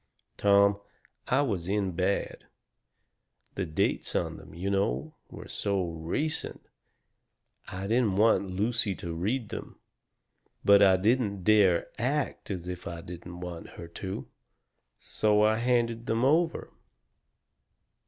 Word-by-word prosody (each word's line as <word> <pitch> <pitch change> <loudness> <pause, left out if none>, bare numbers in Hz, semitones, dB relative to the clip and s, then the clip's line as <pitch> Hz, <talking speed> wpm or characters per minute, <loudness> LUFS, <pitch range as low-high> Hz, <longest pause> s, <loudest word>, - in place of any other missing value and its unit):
"Tom, 100 0 +4 0.5
I 135 +3 +3
was 95 -10 -2
in 100 -1 0
bad. 95 +3 -1 1.1
The 95 -2 -3
dates 80 - -1
on - - -1
them, - - -13
you 95 +3 -2
know, 85 -10 0 0.2
were - - -10
so 95 -4 -1
RECENT. 85 - -2 1.0
I 95 +1 -5
didn't 110 -2 +2
want 105 -2 +3
Lucy 105 +1 0
to 85 -1 -6
read 105 +7 -2
them. - - -8 0.9
But 100 0 +7
I 95 -2 +6
didn't 105 -1 +1
dare 100 -4 +5
to - - -12
ACT 140 +4 -1
as 90 -3 -4
if 90 -1 -6
I 85 -1 -6
didn't 90 +1 -9
want 85 -2 -7
her 85 - -8
to. 95 +3 -6 0.7
So 105 +7 +1
I 110 +1 +3
handed 115 -1 0
them 115 +3 +1
over. 165 +4 +1
100 Hz, 130 wpm, -28 LUFS, 90-115 Hz, 1.1 s, But